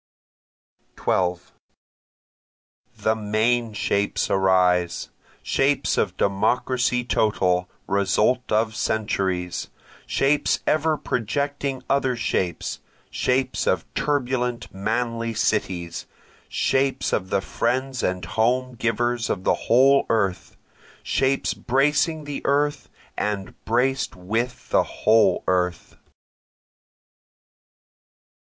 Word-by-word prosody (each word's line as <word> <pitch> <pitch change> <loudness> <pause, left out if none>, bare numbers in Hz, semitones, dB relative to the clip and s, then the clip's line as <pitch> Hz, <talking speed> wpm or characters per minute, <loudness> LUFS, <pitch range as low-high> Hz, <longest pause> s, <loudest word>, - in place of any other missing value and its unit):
12 90 -1 -1 1.5
The 110 0 +1
main 110 +2 +1
shapes 100 -1 0
arise! 90 -2 +2 0.3
Shapes 140 +1 +1
of - - -1
Democracy 125 +5 +1
total, 90 -6 +1 0.2
result 105 +6 +1
of 110 0 +1
centuries, 95 -6 -1 0.4
Shapes 145 +2 +2
ever 155 0 +2
projecting 140 +2 -2
other 135 -2 +1
shapes, 95 -6 -2 0.3
Shapes 130 0 0
of - - +1
turbulent 125 -6 -1
manly 115 +3 -2
cities, 85 -5 -1 0.4
Shapes 135 0 0
of 95 -2 -1
the 100 - +2
friends 130 +5 -1
and 90 0 -1
home 125 +3 0
givers 120 0 -1
of 95 - -2
the - - +3 0.2
whole 135 +4 +5
earth, 100 -5 -1 0.5
Shapes 135 0 +1
bracing 150 +4 +1
the 145 -1 -5
earth 145 +1 +1 0.3
and 100 -2 -3
braced 130 +4 +1
with 115 +7 -3
the - - +5
whole 110 0 +2
earth. 90 -2 -1
115 Hz, 90 wpm, -23 LUFS, 100-130 Hz, 1.5 s, whole